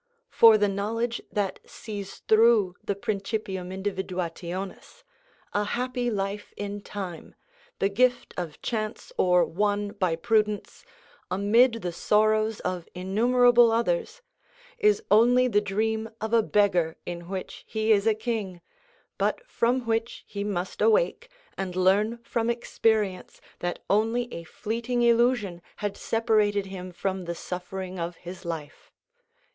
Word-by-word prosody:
For 225 -1 +7
the 205 -1 +3
knowledge 225 +4 -2
that 205 -2 -1
sees 205 -3 -8
through 220 -4 +5
the 200 - -1
principium 200 -3 -3
individuationis, 190 - -5 0.5
a 205 - +1
happy 245 +2 -1
life 200 -1 -3
in 205 0 -4
time, 190 -6 -7 0.4
the 195 - +2
gift 245 +5 +1
of 170 -4 -5
chance 215 -1 -3
or 180 -1 +4
won 205 +3 0
by 185 -5 0
prudence, 210 +3 0 0.5
amid 225 +5 +3
the 175 - -2
sorrows 215 +4 +2
of 180 -2 -4
innumerable 240 +5 +4
others, 465 - -1 0.6
is 425 0 +3
only 245 +4 +5
the 205 -4 +2
dream 220 +2 -1
of 220 +1 -4
a 230 - +6
beggar 185 -7 +2
in 170 0 -6
which 190 -1 -6
he 220 0 0
is 205 0 +4
a 220 - +4
king, 215 -5 -3 0.6
but - - -1
from 245 - +1
which 225 +1 -1
he 200 -1 -5
must 190 -3 -3
awake 485 +2 +2 0.3
and 185 -2 -3
learn 200 +5 +3
from 230 0 -1
experience 220 -5 0 0.2
that 175 0 -3
only 225 +4 +1
a 170 - -6
fleeting 235 +7 -2
illusion 235 -6 +2
had 205 -1 -3
separated 215 -3 +1
him 185 -1 -7
from 185 +1 -3
the 170 0 -4
suffering 185 +1 -6
of 170 +1 -3
his 175 +3 -10
life. 160 -4 -7
210 Hz, 130 wpm, -26 LUFS, 185-230 Hz, 0.6 s, For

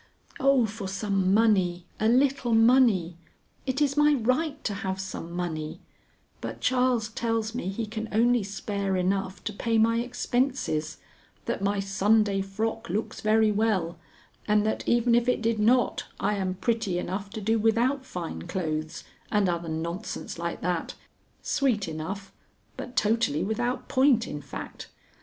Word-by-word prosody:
Oh, 270 -3 +4
for 215 -2 -5
some 195 -1 0
money! 190 -5 +3
a 220 - +2
little 255 -1 +3
money! 225 -8 +4 0.5
it 265 +3 +1
is 280 -1 +1
my 295 0 +5
right 280 +5 0
to 210 - -1
have 190 -2 -3
some 190 -3 -6
money; 165 -2 -4 0.6
but - - -5
Charles 250 -3 +2
tells 225 0 -1
me 245 -6 -4
he 220 +4 -3
can 220 +1 -5
only 240 +2 +3
spare 200 0 -2
enough 190 +1 -1
to 210 - -3
pay 225 +2 0
my 230 +1 +4
expenses, 245 - -1 0.5
that - - -2
my 200 0 +1
Sunday 195 +1 +2
frock 220 +4 -3
looks 215 +3 -3
very 215 0 +4
well, 195 -6 0 0.5
and 210 0 +3
that, 220 - -1
even 235 0 +3
if 240 +1 +3
it 250 - +2
did 225 -1 +1
not, 235 +2 +2
I - - +1
am 190 -2 -1
pretty 200 -1 -1
enough 190 +3 -3
to 220 - -6
do 220 +2 +1
without 235 +5 +2
fine 170 - -6
clothes, 155 -4 -3 0.3
and 205 -2 +3
other 170 -1 -2
nonsense 170 +4 -4
like 170 0 -3
that, 175 -1 -2 0.5
sweet 240 -9 +1
enough, 185 +5 -5 0.4
but 250 - -8
totally 215 -9 +2
without 240 +5 -2
point, 260 -4 +3
in 150 - -5
fact. 140 - -8
215 Hz, 150 wpm, -27 LUFS, 190-235 Hz, 0.6 s, my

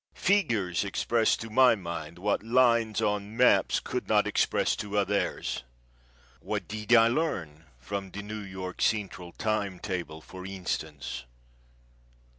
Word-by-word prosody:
Figures 115 - +1
express 110 +3 +1
to 115 -1 -8
my 125 +1 +6
mind 85 -4 -6
what 100 +3 0
lines 115 -1 +3
or 105 0 +1
maps 110 +5 +3
could - - -4
not - - +4
express - - +1
to 105 0 -3
others. 100 0 0 0.8
What - - -4
did 110 +1 -5
I 115 0 +7
learn 100 - -2
from 95 +10 -5
the 100 +2 -7
New 105 +1 -6
York 95 -2 -7
Central 95 -5 -1
time 105 -2 -1
table, 90 -5 -4
for 95 +3 -10
instance? 90 -9 -4
100 Hz, 130 wpm, -28 LUFS, 90-110 Hz, 0.8 s, I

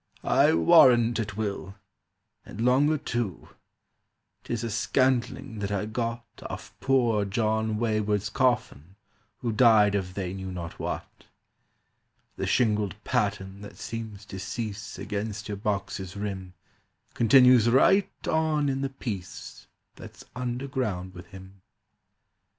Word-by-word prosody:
"I - - +4
warrant 115 +7 +6
it 105 -2 -4
will. 100 -2 -4 0.7
And 100 - -11
longer 135 +6 +3
too. 120 - -4 0.9
'Tis 120 -1 -3
a 115 - -3
scantling 120 0 0
that 100 0 -3
I 100 0 -1
got 115 +1 -3 0.2
Off - - -8
poor 120 -6 +2
John 110 +1 0
Wayward's 105 -2 0
coffin, 110 - 0 0.5
who 120 - -1
Died 110 -3 +5
of 95 -2 -2
they 95 -2 -3
knew 95 -1 -6
not 85 -2 -7
what. - - -6 1.1
"The - - -3
shingled 105 -5 +1
pattern 100 -1 -2
that 100 - -11
seems 110 -3 -7
to 95 - -8
cease 105 +1 -5
Against 105 +1 -4
your 105 -2 -4
box's 100 -2 -3
rim 95 -3 -5 0.6
Continues 125 0 +6
right 190 +10 +4 0.2
on 155 -2 +1
in 135 0 -1
the 135 - -1
piece 105 -9 -7 0.3
That's - - -12
underground 125 -7 -3
with 90 -1 -11
him. 95 +1 -13
110 Hz, 120 wpm, -27 LUFS, 100-120 Hz, 1.1 s, warrant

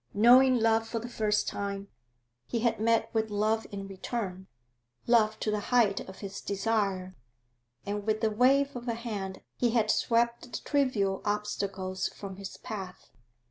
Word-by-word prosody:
Knowing 250 +4 +7
love 225 0 +2
for 230 - -3
the 230 +1 -4
first 215 -3 0
time, 200 0 -3 0.6
he 230 - -2
had 235 -2 +1
met 230 +1 +2
with 220 -1 0
love 215 +2 0
in 195 -1 -6
return, 190 -1 -5 0.6
love 220 -2 +3
to 215 - -1
the 210 - 0
height 230 -5 +4
of 190 - -10
his 195 -1 -6
desire, 195 -3 -1 0.7
and 205 +1 -3
with 215 +1 0
a 220 - +3
wave 270 +5 +3
of 245 0 -6
the 235 - 0
hand 205 -5 -5
he 240 - +2
had 225 -2 +2
swept 235 0 +2
the - - -3
trivial 230 -10 +1
obstacles 195 -2 -2
from 195 -2 -8
his 195 -1 -8
path. 190 -4 -8
215 Hz, 160 wpm, -29 LUFS, 200-235 Hz, 0.7 s, Knowing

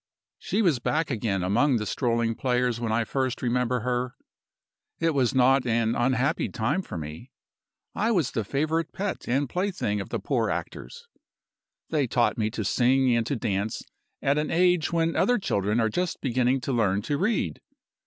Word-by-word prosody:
"She 220 - 0
was 160 -10 +3
back 155 +5 -1
again 100 -5 -1
among 120 +9 +2
the 105 -2 -1
strolling 115 -1 0
players 125 -1 0
when 115 -2 -2
I 115 +1 +2
first 130 +1 -2
remember 125 0 0
her. 125 +1 -2 0.8
It 165 -1 +1
was 130 -4 +1
not 130 0 +4
an 115 -1 +1
unhappy 130 +5 +1
time 130 +11 -1
for 180 - -7
me. 80 - -7 0.6
I 220 - 0
was 170 - +1
the 115 - -1
favorite 155 - -1
pet 200 +1 -4
and 135 +4 +1
plaything 180 - -1
of - - -8
the - - -2
poor - - 0
actors. 480 0 -6 0.8
They 145 -5 +1
taught 120 0 +2
me 110 -1 0
to 115 - -4
sing 130 0 +3
and 115 -1 0
to 140 - -1
dance 105 -1 -2 0.4
at 140 +2 +2
an 150 - -2
age 175 -1 +2
when 165 -1 +1
other 245 0 +3
children 105 - 0
are 110 - +3
just 180 +10 -2
beginning 130 0 +1
to 135 - -2
learn 100 -4 +1
to 145 +4 -1
read. 215 +5 0
125 Hz, 175 wpm, -26 LUFS, 115-155 Hz, 0.8 s, not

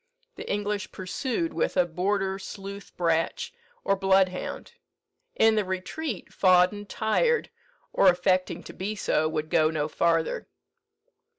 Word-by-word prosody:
The - - -6
English 205 -1 -2
pursued 260 - -3
with - - -1
a 180 - +5
border 190 +3 -1
sleuth 200 0 -8
bratch, 170 - 0 0.3
or 195 - +2
bloodhound. 190 - +1 0.6
In 225 - +5
the 215 -1 +2
retreat, 190 - -4
Fawdon, 185 +2 +3
tired, 465 - +1 0.4
or - - +4
affecting 180 -1 +1
to - - -10
be 205 +3 -4
so, 155 -5 +1
would 155 -1 -3
go 155 -1 +4
no 155 -2 -1
farther. 165 +1 0
190 Hz, 125 wpm, -27 LUFS, 175-205 Hz, 0.6 s, a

